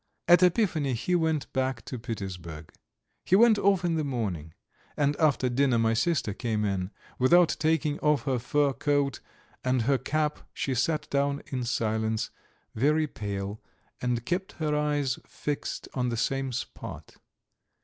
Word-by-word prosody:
At 175 +1 +7
Epiphany 170 - +2
he 125 +10 -1
went 160 -4 0
back 130 -2 -1
to 125 - -5
Petersburg. 90 -9 -6 0.5
He 185 - +3
went 220 0 +6
off 195 -2 +3
in 165 -2 +1
the 155 - 0
morning, 100 - -3 0.4
and 145 0 +2
after 145 -4 +3
dinner 125 0 +2
my 115 0 +3
sister 115 -3 +1
came 110 -1 -1
in. 95 -2 -1 0.3
Without 170 +6 +5
taking 155 -2 +1
off 150 -1 +2
her 135 -3 0
fur 140 +3 +1
coat 140 -3 0 0.4
and 130 -2 +1
her 135 +2 +2
cap 150 0 -1 0.2
she 135 - -1
sat 150 +5 0
down 140 0 0
in 130 -2 -1
silence, 110 -2 -1 0.4
very 150 +7 +2
pale, 100 -5 -5 0.4
and 120 -1 -1
kept 185 +2 -2
her 150 -2 -1
eyes 145 -3 0
fixed 145 -1 -4
on 125 -2 0
the 115 - -2
same 135 +2 -1
spot. 125 - -7
135 Hz, 150 wpm, -28 LUFS, 115-155 Hz, 0.5 s, At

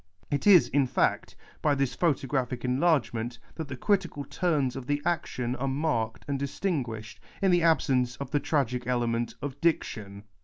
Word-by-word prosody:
It 145 +7 0
is, 185 -5 +8
in 140 -2 +2
fact, - - 0 0.3
by 150 -2 +3
this 135 -2 0
photographic 135 -6 0
enlargement 125 -4 +1 0.2
that 160 -3 -5
the 130 -1 -6
critical 180 - 0
turns 150 -8 0
of 130 -1 -6
the 145 0 +1
action 130 -7 -1
arc 135 +2 -2
marked 130 -6 -1
and 140 -1 -1
distin 145 +2 -1
guished, 110 -2 -8 0.2
in 195 -1 +3
the 175 -1 +4
absence 130 -7 +2
of 140 - -7
the 145 - +2
tragic 125 -5 -1
element 120 -1 0
of 140 0 -5
diction. 105 -11 -1
135 Hz, 165 wpm, -28 LUFS, 125-155 Hz, 0.3 s, is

